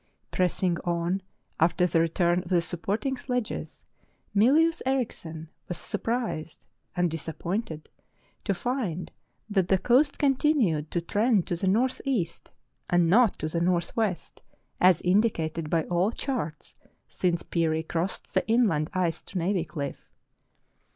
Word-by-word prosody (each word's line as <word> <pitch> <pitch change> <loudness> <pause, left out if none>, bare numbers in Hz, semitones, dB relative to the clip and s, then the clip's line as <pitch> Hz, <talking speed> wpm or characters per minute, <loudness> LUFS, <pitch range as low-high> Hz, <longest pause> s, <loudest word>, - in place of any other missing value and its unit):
Pressing 180 -1 +1
on 175 +2 -1 0.4
after 175 +2 +3
the 170 -2 +2
return 170 +2 +2
of 175 - -12
the 180 -2 +4
supporting 195 - -2
sledges, 250 -3 -4 0.5
Mylius 300 +10 +4
Erichsen 195 -12 -2 0.2
was 175 - -4
surprised 225 -9 -3 0.3
and 175 -2 +1
disappointed 165 +2 -4 0.6
to 200 - +1
find 210 - -2 0.4
that 195 -4 +1
the 190 - +4
coast 265 +8 +3
continued 260 - +2
to 175 - -1
trend 205 +2 +2
to 175 - -2
the 190 +3 -2
north 240 +7 +2
east, 215 - -2 0.4
and 175 -1 +3
not 230 0 +5
to 155 - -3
the 170 +2 -2
northwest, 180 +2 -1 0.4
as 180 -2 +5
indicated 170 -5 +1
by 165 0 +2
all 180 +6 +1
charts 230 - -4 0.3
since 175 -2 -1
Peary 160 -2 0
crossed 170 +3 -3
the 185 - +2
inland 215 -10 +2
ice 175 -3 0
to 195 - -7
Navy 180 0 0
Cliff. 140 -5 -6
180 Hz, 130 wpm, -27 LUFS, 165-225 Hz, 0.6 s, not